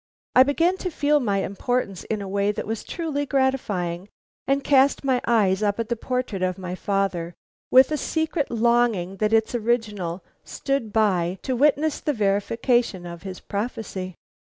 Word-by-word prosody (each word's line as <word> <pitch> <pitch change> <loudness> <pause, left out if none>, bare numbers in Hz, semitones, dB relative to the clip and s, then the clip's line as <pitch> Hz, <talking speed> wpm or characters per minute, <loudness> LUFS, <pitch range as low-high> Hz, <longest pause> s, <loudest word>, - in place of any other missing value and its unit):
I 255 - +8
began 330 +7 +3
to 370 - -3
feel 295 -2 +2
my 200 -6 0
importance 200 -1 -2
in 215 -2 -3
a - - -6
way 200 +1 +1
that - - -4
was 225 0 -4
truly 295 -4 -3
gratifying, 210 -10 -1 0.4
and 275 +1 +1
cast 275 0 +3
my 260 -2 +1
eyes 210 -4 +3
up 205 0 0
at 230 0 -2
the 235 - 0
portrait 250 -4 -3
of 185 -1 0
my 180 -1 -5
father 185 -3 -2 0.3
with 260 +3 +6
a 305 - +1
secret 320 -1 -1
longing 230 -5 +1
that 215 +2 0
its 225 +1 +2
original 210 -7 -1 0.2
stood 275 -6 -3
by 190 -5 +1
to 260 - -1
witness 295 +3 +2
the 295 - -1
verification 215 -1 0
of 170 -1 -8
his 190 -2 -7
prophecy. 200 -4 -5
225 Hz, 165 wpm, -24 LUFS, 195-265 Hz, 0.4 s, I